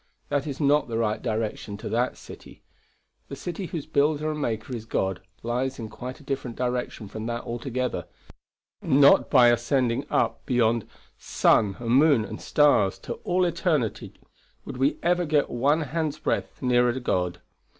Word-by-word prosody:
That 145 0 -1
is 140 -2 -5
not 145 -1 +3
the 115 -1 -3
right 110 -2 0
direction 110 -3 -3
to - - -7
that 120 +2 0
city. - - -13 0.6
The - - -7
city 180 +1 -5
whose 160 -2 -5
builder 155 0 +1
and 150 -1 -4
maker 115 0 -3
is 110 -1 -7
God 95 -4 -1 0.2
lies 125 +3 -2
in 110 -2 -6
quite 125 +6 -8
a - - -15
different 135 -4 -4
direction 125 -3 -3
from 110 +3 -6
that 120 0 -3
altogether; 125 +1 -3 0.7
not 140 +1 +5
by 125 -4 +6
ascending 120 +2 +1
up - - 0
beyond 115 -3 +2 0.3
sun 100 -3 +2
and 115 -1 -3
moon 135 -3 +5
and - - -8
stars 140 -10 +3
to - - -6
all 180 +1 +2
eternity 165 - -1 0.5
would - - -7
we 135 +3 +1
ever 175 +1 +2
get 150 -3 +1
one 140 +6 +2
hand's 155 0 -2
breadth 155 - -3
nearer 125 0 +2
God. 90 -7 -1
125 Hz, 160 wpm, -25 LUFS, 115-145 Hz, 0.7 s, by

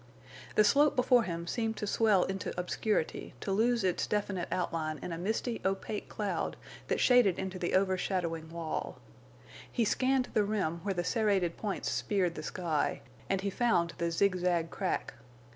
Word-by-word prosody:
The 215 - +6
slope 285 +8 +4
before 250 -2 +4
him 170 -1 -4
seemed 225 +4 -2
to - - -2
swell 205 -3 +3
into 190 -1 -3
obscurity 180 0 -1
to 195 - -3
lose 230 +3 +2
its 185 -2 0
definite 200 -4 -1
outline 160 -3 -1
in - - -4
a 165 - -3
misty, 220 +5 -2
opaque 195 +2 -2
cloud 205 -2 -2 0.3
that - - 0
shaded 245 -8 +5
into 190 -1 -4
the 175 - 0
over 190 -1 +2
shadowing 165 -4 -2
wall. 165 -1 -4 0.7
He 235 - +1
scanned 260 +3 +1
the 215 - +3
rim 200 -6 -1
where 195 +1 -2
the 175 - 0
serrated 195 -5 +1
points 205 -3 -3
speared 185 -5 0
the - - -6
sky, 165 -5 -1 0.3
and 195 -1 +1
he 200 0 -1
found 180 -8 +2
the 170 0 +1
zigzag 175 -2 +1
crack. 190 - -2
190 Hz, 165 wpm, -31 LUFS, 175-215 Hz, 0.7 s, The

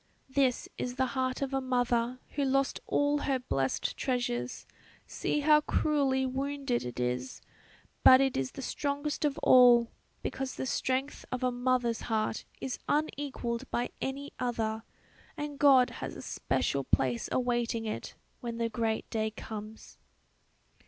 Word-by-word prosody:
"This 265 -2 +1
is 245 0 -3
the 260 0 +2
heart 260 +1 -1
of 275 0 -3
a 270 - +1
mother 245 -1 +1
who 285 - -2
lost 275 0 +1
all 290 0 +2
her 275 -2 +1
blessed 135 - -1
treasures; 185 - -2 0.4
see 295 - -1
how 300 +1 +6
cruelly 275 -4 +1
wounded 275 -1 -1
it 125 0 -6
is; 125 +1 -2 0.6
but 255 - +9
it 270 -1 +2
is 130 -1 -2
the 270 - -7
strongest 285 +3 -2
of 290 -2 0
all, 240 -2 +7 0.3
because 265 -1 -3
the - - -3
strength 260 +2 -1
of 255 0 -2
a 250 - +2
mother's 245 -1 0
heart 220 -1 -1
is 265 - -4
unequalled 270 -5 -1
by 240 +1 -1
any 275 +2 -4
other 225 -3 -1 0.6
and 295 -1 -5
God 265 -3 +6
has - - -6
a - - -7
special 140 -1 -1
place 130 -2 0
awaiting 240 -2 0
it 215 - -5 0.2
when 235 -2 -5
the 230 0 0
great 225 0 -1
Day 220 -1 0
comes." 215 0 -9
255 Hz, 145 wpm, -30 LUFS, 230-275 Hz, 0.6 s, but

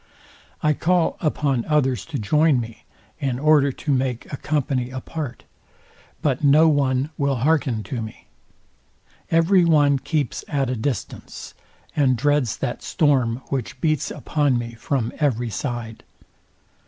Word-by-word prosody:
I 150 0 +4
call 175 +3 +1
upon 140 -6 0
others 135 -9 +1
to - - -4
join 150 +6 +3
me, 115 -1 -8 0.3
in 135 -4 -1
order 145 0 +4
to 145 +2 -2
make 130 -2 -2
a - - -2
company 135 -4 -1
apart; 130 0 -6 0.8
but 140 -2 0
no 150 +3 +6
one 140 -1 +1
will 140 -1 +1
hearken 130 -4 +1
to 115 +4 -4
me. 110 -1 -9 1.0
Every 170 +3 +4
one 145 -4 +4
keeps 145 -3 -2
at 135 -4 -1
a - - -1
distance, 120 0 -5 0.4
and 130 -4 +3
dreads 145 -2 +1
that 125 -2 -3
storm, 130 -5 +1
which 135 -3 -3
beats 155 -4 0
upon 145 -4 0
me 115 0 -4
from 115 0 -2
every 120 -6 0
side. 120 -1 -5
135 Hz, 135 wpm, -22 LUFS, 125-150 Hz, 1.0 s, no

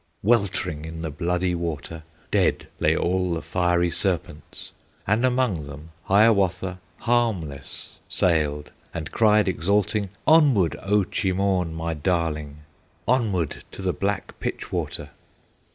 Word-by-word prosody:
Weltering 100 -7 +1
in 80 +1 -6
the 80 - -3
bloody 90 +3 0
water, 80 -1 -4 0.3
Dead - - +2
lay - - +3
all 90 0 +1
the 80 - -3
fiery 85 -1 +1
serpents, 90 -3 -3 0.3
And 105 +4 +2
among 125 - +1
them 75 +3 -10
Hiawatha 95 -3 +3 0.2
Harmless 100 - -1
sailed, 75 -4 +1 0.2
and 80 -3 -4
cried 105 -2 +4
exulting: 100 +3 +1 0.2
"Onward, 140 - +5
O 105 +1 +2
Cheemaun, 95 -2 0
my 80 0 -2
darling! 75 -2 -1 0.5
Onward 105 - +1
to 95 - -9
the 90 -1 +1
black 100 +1 -3
pitch - - -4
water!" - - -3
90 Hz, 120 wpm, -24 LUFS, 80-100 Hz, 0.5 s, Onward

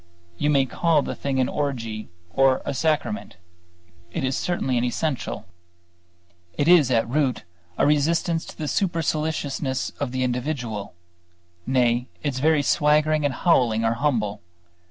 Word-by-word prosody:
You 145 - +1
may 140 -2 +4
call 155 +2 +2
the - - -4
thing 135 -2 -2
an 130 - +2
orgy 115 -7 -3 0.2
or 135 +1 +3
a 140 - -2
sacrament; 160 - -1 0.7
it - - -3
is 130 0 0
certainly 155 -8 -1
an - - -1
essential. 130 +3 -2 1.1
It 145 - +1
is 170 -7 +6
at 115 -3 +2
root 135 0 0 0.3
a - - +3
resistance 165 +3 +2
to - - -11
the 155 - -4
superciliousness 155 -6 -1
of 140 -3 -2
the 130 0 -1
individual. 125 - -3 0.7
Nay, 125 -1 +2 0.2
its 135 -3 -1
very 155 +1 +3
swaggering 150 +2 +3
and 140 - +1
howling 120 -10 +2
are 115 - +2
humble. 115 -6 -1
140 Hz, 140 wpm, -24 LUFS, 125-155 Hz, 1.1 s, is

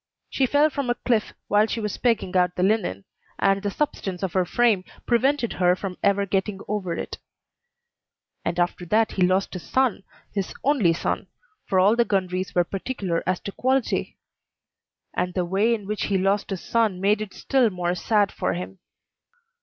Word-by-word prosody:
She 265 - +2
fell 295 +4 +3
from 275 -3 -2
a 240 - +2
cliff 235 -3 0 0.2
while 210 +1 +4
she 230 - -3
was 210 -2 -3
pegging 230 -6 +1
out 180 -1 +3
the 180 - 0
linen, 190 - 0 0.3
and 195 0 +2
the 205 - -1
substance 195 -8 -3
of 185 -4 -2
her 185 -1 +2
frame 220 -1 +2 0.2
prevented 250 +1 +2
her 180 0 +5
from 185 -1 -5
ever 200 0 +2
getting 195 +1 -1
over 195 -4 -2
it. - - -5 1.2
And 170 +1 -2
after 175 0 0
that 220 +4 +2
he 190 - -3
lost 185 +2 +2
his 180 - -5
son, 260 -2 +1 0.3
his 195 -2 -3
only 250 - +3
son - - -2 0.4
for 190 - +2
all 200 +4 +5
the 235 - +4
Gundries 185 -2 -1
were 175 - +4
particular 190 -2 -3
as 185 -1 +1
to 200 - -5
quality; 260 +3 0 1.0
and 180 0 -2
the 180 -2 +1
way 195 +6 +2
in 220 -4 -1
which 210 +1 -2
he 200 - +1
lost 195 +2 +1
his 195 -3 -3
son 220 -5 +1
made 205 +2 +2
it 215 -3 -6
still 260 -4 +2
more 180 -2 -1
sad 205 +3 +1
for 95 - -1
him. 90 +2 -6
200 Hz, 185 wpm, -24 LUFS, 180-225 Hz, 1.2 s, her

